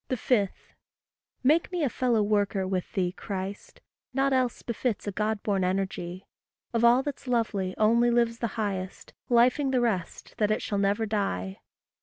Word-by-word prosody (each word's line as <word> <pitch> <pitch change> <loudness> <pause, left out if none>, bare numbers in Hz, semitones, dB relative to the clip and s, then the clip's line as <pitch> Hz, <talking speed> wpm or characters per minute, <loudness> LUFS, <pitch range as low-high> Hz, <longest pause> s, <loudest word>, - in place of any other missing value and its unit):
5. 235 -5 +2 0.9
Make 310 +8 +3
me 355 -3 -1
a - - +3
fellow 240 -3 +1
worker 205 -2 +1
with 185 -2 -2
thee, 180 -3 0
Christ; 195 +1 -6 0.3
Nought 270 0 +2
else 255 -2 0
befits 235 -1 -2
a 205 - -2
God 210 +1 -1
born 195 -3 +1
energy; 185 -1 -2 0.5
Of 230 0 +1
all 240 +3 +6
that's 285 -2 -6
lovely, 210 -6 0
only 235 +3 +4
lives 235 -1 +1
the 235 - 0
highest, 195 -3 -4 0.2
Lifing 250 +4 +4
the 255 - +2
rest 215 -8 -2
that 210 -1 +2
it 215 - 0
shall 205 - -1
never 200 +3 +1
die. 100 - -2
215 Hz, 160 wpm, -27 LUFS, 195-240 Hz, 0.9 s, all